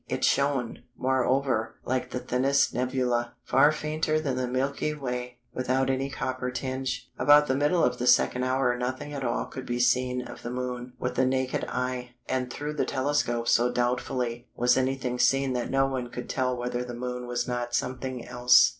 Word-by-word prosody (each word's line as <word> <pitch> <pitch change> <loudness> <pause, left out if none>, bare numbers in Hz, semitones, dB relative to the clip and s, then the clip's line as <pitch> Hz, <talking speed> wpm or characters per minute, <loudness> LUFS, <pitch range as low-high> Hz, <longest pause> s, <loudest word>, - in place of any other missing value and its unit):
It - - -3
shone, 140 -4 +1 0.2
moreover, 130 -2 +1
like 125 0 -1
the - - -3
thinnest 130 +3 +2
nebula, 125 -1 0
far 135 +4 +5
fainter 155 +1 0
than 140 -5 -1
the 125 0 -1
Milky 135 +4 -1
Way, 125 -3 -4 0.2
without 130 +1 +1
any 135 +1 -1
copper 130 -1 -3
tinge. 130 +1 -3
About 145 0 +7
the 130 - +1
middle 150 +5 +2
of 125 0 +1
the 125 - -1
second 125 0 +4
hour 130 -1 +2
nothing 130 +4 -4
at 140 -2 -4
all 120 - 0
could 130 - -8
be 120 0 -1
seen 125 +1 +2
of - - -10
the 120 - -5
Moon 125 0 -4
with 125 0 -2
the 130 +1 +2
naked 130 0 0
eye, 125 -1 -3
and 130 -1 -1
through 150 +3 -4
the 150 - 0
telescope 130 -4 0
so 120 +1 +4
doubtfully 120 0 -1
was 125 +1 +3
anything 130 -1 -1
seen 135 0 +3
that 125 -1 -2
no 135 0 +3
one 130 -2 -3
could 125 - -6
tell 125 -1 0
whether 120 0 -2
the 120 -1 -6
Moon 125 0 -4
was 120 0 -1
not 120 -1 -2
something 130 -1 -3
else." 125 0 +6
125 Hz, 185 wpm, -27 LUFS, 125-135 Hz, 0.2 s, About